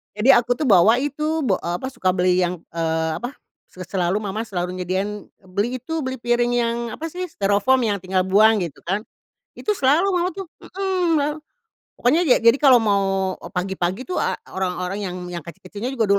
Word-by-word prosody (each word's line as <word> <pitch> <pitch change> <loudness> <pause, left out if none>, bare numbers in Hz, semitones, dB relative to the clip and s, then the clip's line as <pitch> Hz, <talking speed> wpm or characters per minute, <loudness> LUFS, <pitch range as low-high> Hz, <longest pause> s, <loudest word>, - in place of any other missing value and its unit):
Jadi 215 +6 +5
aku 245 +1 +2
tuh 310 - -3
bawa 205 +1 +6
itu 305 +2 -1
ba 200 -8 +1
eee, 175 +10 -4
suka 185 -8 -1
beli 180 0 +2
yang, 180 -1 -1
eee, 160 -1 -1
apa, 245 +3 -6 0.3
se 185 - -10
selalu 185 +1 0
mamah 210 +2 -3
selalu 180 -3 -3
nyediain 195 +3 -3 0.2
beli 235 +7 -1
itu, 320 +4 -3
beli 260 -3 -3
piring 240 0 +1
yang, 235 -1 +1 0.2
apa 325 +1 -6
sih, 365 +2 -4
stirofoam 205 - +2
yang 205 -3 0
tinggal 185 0 0
buang, 210 +2 +4
gitu 160 -4 -7
kan. 195 +4 -1 0.5
Itu 420 - -1
selalu 300 +5 +3
mamah 355 +1 0
tuh 390 -2 -6 0.2
hmm, 345 -6 0 0.6
pokoknya 285 +8 +3
ja - - +6
jadi 230 0 +7
kalau 270 -4 +7
mau 195 -3 +1
e - - -8
pagi-pagi 185 +4 -2
tuh 365 - -2
a - - -1 0.2
orang-orang 185 +1 -2
yang 185 -3 -4 0.2
yang 170 - -4
kecil-kecilnya 185 - -7
juga 230 -4 +1
210 Hz, 180 wpm, -22 LUFS, 185-260 Hz, 0.6 s, jadi